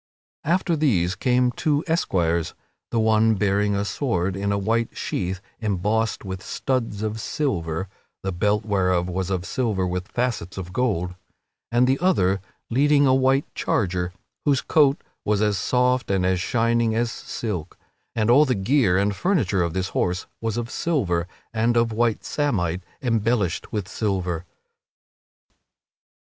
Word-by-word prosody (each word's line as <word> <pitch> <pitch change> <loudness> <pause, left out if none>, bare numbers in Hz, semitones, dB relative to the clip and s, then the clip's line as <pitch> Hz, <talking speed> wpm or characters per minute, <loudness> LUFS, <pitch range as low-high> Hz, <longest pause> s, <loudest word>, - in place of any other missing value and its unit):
After 175 +1 +1
these 100 - +2
came 125 +4 +2
two 145 +4 0
other 160 - 0
esquires, 85 - 0 0.3
the 115 - 0
one 110 0 +4
bearing 100 +1 +1
a 100 +1 0
sword 95 -7 -1
in 100 +1 -1
a 100 - +1
white 115 +3 0
sheath 90 +1 -2 0.2
embossed 105 +1 0
with 95 -1 -5
studs 115 -5 -2
of 110 +1 -2
silver 95 - -2 0.4
(the 95 - -1
belt 105 +4 +1
whereof 90 -4 +1
was 95 +1 -2
of 90 -2 -1
silver 105 -3 0
with 90 +1 -3
facets 120 -9 -2
of 90 -1 -6
gold) 95 -8 0 0.6
and 120 +1 +4
the 130 +2 +2
other 100 - +2 0.3
leading 145 +3 +4
a 130 - +5
white 135 +1 +3
charger, 90 -3 0 0.3
whose 140 -3 +2
coat 145 -2 +4 0.2
was 105 -1 +1
as 105 -2 +1
soft 125 0 +1
and 95 -2 +1
as 95 -1 +1
shining 115 0 +1
as 115 0 +1
silk. 95 -9 -5 0.4
And 110 +1 +2
all 145 +5 +7
the 130 - +1
gear 100 -1 +3
and 100 +1 +1
furniture 110 - +1
of 85 -2 0
this 95 0 -1
horse 90 +1 -1 0.2
was 115 -1 -2
of 120 0 -3
silver 95 - 0 0.3
and 115 +1 +2
of 115 -1 +3
white 115 0 +1
samite 95 - -1 0.2
embellished 115 -6 0
with 105 -4 -2
silver. 90 -4 -2
105 Hz, 150 wpm, -24 LUFS, 95-125 Hz, 0.6 s, all